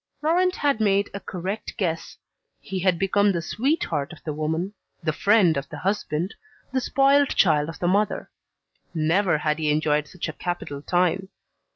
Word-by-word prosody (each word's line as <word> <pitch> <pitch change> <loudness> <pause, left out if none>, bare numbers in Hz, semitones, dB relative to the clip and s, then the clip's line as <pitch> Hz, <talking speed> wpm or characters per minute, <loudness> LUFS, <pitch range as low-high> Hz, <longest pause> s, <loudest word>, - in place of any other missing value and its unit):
Laurent 360 +4 +2
had 280 -6 +1
made 200 -1 +2
a 200 - -4
correct 190 +3 -5
guess: 165 -6 -2 0.4
he 190 -1 -5
had 185 -1 +2
become 200 +2 +3
the 175 - -1
sweetheart 170 - -1
of 175 - -10
the 155 - -3
woman, 160 +6 -2 0.3
the 155 -1 0
friend 200 -1 +4
of 140 - -4
the 155 - -7
husband, 185 -1 -1 0.4
the 260 - +1
spoilt 275 +2 +4
child 155 -4 +3
of 165 - -7
the 175 - -1
mother. 205 +3 +1 0.7
Never 165 +2 +2
had 150 +1 -1
he 155 -1 0
enjoyed 150 0 +1
such 180 +1 -5
a 155 - -5
capital 165 -4 -4
time. 180 +3 +1
180 Hz, 170 wpm, -24 LUFS, 155-205 Hz, 0.7 s, friend